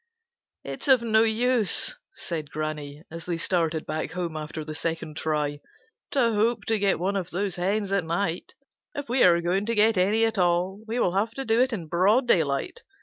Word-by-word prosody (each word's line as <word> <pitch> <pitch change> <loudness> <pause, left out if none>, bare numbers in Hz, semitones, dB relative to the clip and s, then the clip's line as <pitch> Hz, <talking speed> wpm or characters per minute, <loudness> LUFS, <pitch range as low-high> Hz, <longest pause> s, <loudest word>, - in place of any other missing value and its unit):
"It's - - -7
of 260 -3 +5
no 220 -1 +3
use," 235 - +2 0.2
said 155 -4 -5
Granny, 150 -1 -5
as 165 +1 -8
they 175 -2 -1
started 165 -2 0
back 155 +1 -4
home 175 -2 -3
after 155 0 -5
the 155 - -6
second 160 -1 -3
try, 150 -2 -1 0.5
"to 240 -5 +2
hope 215 +1 +1
to 220 -1 +2
get 200 -1 +2
one 190 +4 -1
of 190 -3 -2
those 190 0 -2
hens 195 +3 -1
at 200 -2 +1
night. 170 +1 -2 0.4
If 285 -3 -5
we 250 +2 +1
are 170 -1 +6
going 185 +4 0
to 230 - 0
get 215 -1 +3
any 210 +5 +3
at 220 -3 -1
all, 180 +3 +1
we 230 +3 -2
will 180 - +1
have 215 +4 0
to 270 - -4
do 225 +2 +3
it 260 +1 +2
in 190 -8 -4
broad 195 - +2
daylight. 160 - +1
190 Hz, 200 wpm, -26 LUFS, 165-225 Hz, 0.5 s, are